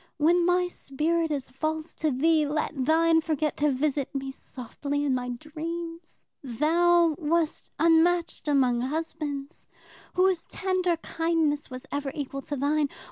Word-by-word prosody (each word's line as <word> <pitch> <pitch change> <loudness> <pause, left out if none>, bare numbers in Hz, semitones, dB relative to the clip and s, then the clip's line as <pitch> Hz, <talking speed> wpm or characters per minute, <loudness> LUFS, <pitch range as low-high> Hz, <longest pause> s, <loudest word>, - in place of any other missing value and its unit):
When 340 +3 +3
my 360 0 +3
spirit 325 +1 -1
is 270 -3 -3
false 310 +4 -3
to 310 - -1
thee, 305 +3 +2
let 300 +2 -1
thine 325 +2 +4
forget 310 -2 -1
to 295 0 +2
visit 280 0 -1
me 270 0 -3
softly 280 +3 -5
in 275 - +2
my 250 -1 -2
dreams. 330 +5 -6 0.2
Thou 330 +6 +3
wast 320 0 0
unmatched 335 +1 +3
among 255 -4 +3
husbands. 295 +1 -4 0.5
Whose 365 -2 +2
tender 370 -3 0
kindness 325 -3 0
was 255 -1 -8
ever 285 -1 -2
equal 275 -1 -4
to 290 - -4
thine? 290 +1 +1
310 Hz, 135 wpm, -27 LUFS, 280-330 Hz, 0.5 s, thine